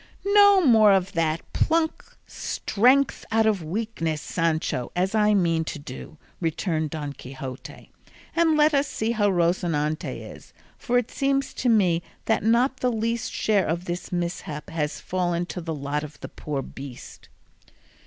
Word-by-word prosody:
"No 405 -2 +7
more 220 -5 +6
of 190 -1 +1
that: 165 -1 0
pluck 320 0 0
strength 255 +6 +1
out 225 0 +3
of 210 -4 +2
weakness, 165 -3 -2
Sancho, 160 -6 -1
as 185 +3 0
I 210 -1 +3
mean 165 -4 +2
to - - -5
do," 145 +1 -9 0.2
returned 160 -1 -1
Don 145 -2 -5
Quixote, 130 -1 -9 0.4
"and 330 -2 +3
let 300 +1 +4
us 280 0 +2
see 220 +1 -2
how 210 -3 +2
Rocinante 170 -4 0 0.2
is, - - -17 0.2
for 245 -1 0
it 245 -2 -1
seems 275 -1 0
to 250 - 0
me 185 -7 +3 0.2
that 225 - +2
not 240 +4 +2
the 250 -1 0
least 230 +1 -2
share 205 -3 +1
of 170 +3 -2
this 175 0 -5
mishap 170 -4 -4
has 150 -2 -2
fallen 175 -1 -1
to 180 - -6
the 165 -1 -4
lot 145 +1 -3
of 150 0 -10
the - - -7
poor 145 -3 -4
beast." 135 -2 -10
180 Hz, 155 wpm, -25 LUFS, 155-230 Hz, 0.4 s, No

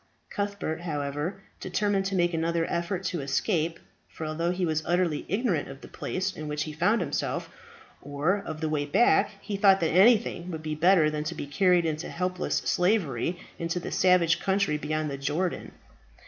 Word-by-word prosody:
Cuthbert, 200 -5 -3
however, 150 +4 -3 0.2
determined 195 +1 0
to 195 0 -1
make 175 -1 +2
another 165 0 0
effort 175 +2 -2
to 175 -4 -2
escape; 160 +4 0 0.3
for 160 - -7
although 160 +2 -1
he 180 0 0
was 155 -2 0
utterly 175 -3 0
ignorant 200 - 0
of 135 0 -10
the - - -10
place 190 +1 -3
in 155 - -6
which 150 0 -2
he 155 - -6
found 210 +8 +2
himself, 175 - -2 0.5
or 145 +8 0
of 155 -3 -6
the 160 - 0
way 150 -2 0
back, 235 +11 +4
he 205 -2 -4
thought 195 -1 +5
that 165 -3 +1
anything 195 -2 +4
would 160 -3 -6
be 155 0 -3
better 160 0 +4
than 150 0 -2
to 165 +2 -3
be - - -5
carried 180 +3 +3
into 155 0 -2
helpless 180 +1 -2
slavery 180 - +1 0.2
into 170 +1 -2
the - - -6
savage 180 -2 +3
country 195 -5 +1
beyond 155 0 -2
the 140 - -5
Jordan. 170 +6 -2
170 Hz, 180 wpm, -27 LUFS, 155-185 Hz, 0.5 s, thought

